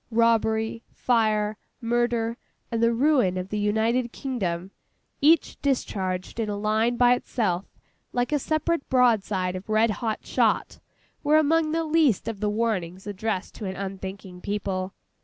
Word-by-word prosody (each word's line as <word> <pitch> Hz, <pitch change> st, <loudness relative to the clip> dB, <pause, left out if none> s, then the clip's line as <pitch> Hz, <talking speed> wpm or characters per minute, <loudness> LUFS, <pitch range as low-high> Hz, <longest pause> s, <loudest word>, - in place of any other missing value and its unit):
Robbery, 225 Hz, -1 st, +2 dB
fire, 215 Hz, -3 st, +1 dB, 0.2 s
murder, 235 Hz, -1 st, 0 dB, 0.4 s
and 230 Hz, -1 st, -1 dB
the 230 Hz, 0 st, +4 dB
ruin 245 Hz, -7 st, +3 dB
of 185 Hz, +1 st, -4 dB
the 210 Hz, -, -2 dB
United 225 Hz, +4 st, +1 dB
Kingdom—each 240 Hz, -, -1 dB
discharged 190 Hz, -8 st, -2 dB
in 220 Hz, -2 st, -1 dB
a 205 Hz, -, -2 dB
line 220 Hz, +3 st, +1 dB
by 245 Hz, 0 st, +6 dB
itself, 200 Hz, -7 st, -1 dB, 0.5 s
like 245 Hz, +2 st, -1 dB
a 295 Hz, -, +2 dB
separate 310 Hz, +2 st, -1 dB
broad 245 Hz, -5 st, +4 dB
side 185 Hz, -3 st, -2 dB
of 185 Hz, +3 st, -8 dB
red 215 Hz, +1 st, +3 dB
hot 220 Hz, +1 st, -3 dB
shot—were 300 Hz, +1 st, 0 dB
among 310 Hz, +1 st, +3 dB
the 330 Hz, +1 st, 0 dB
least 310 Hz, -, +2 dB
of 225 Hz, -3 st, -4 dB
the 210 Hz, 0 st, 0 dB
warnings 195 Hz, -5 st, -2 dB
addressed 205 Hz, -1 st, -3 dB
to 210 Hz, -, -7 dB
an 190 Hz, 0 st, -4 dB
unthinking 190 Hz, -1 st, -7 dB
people. 195 Hz, -2 st, -3 dB
220 Hz, 140 wpm, -25 LUFS, 195-245 Hz, 0.5 s, by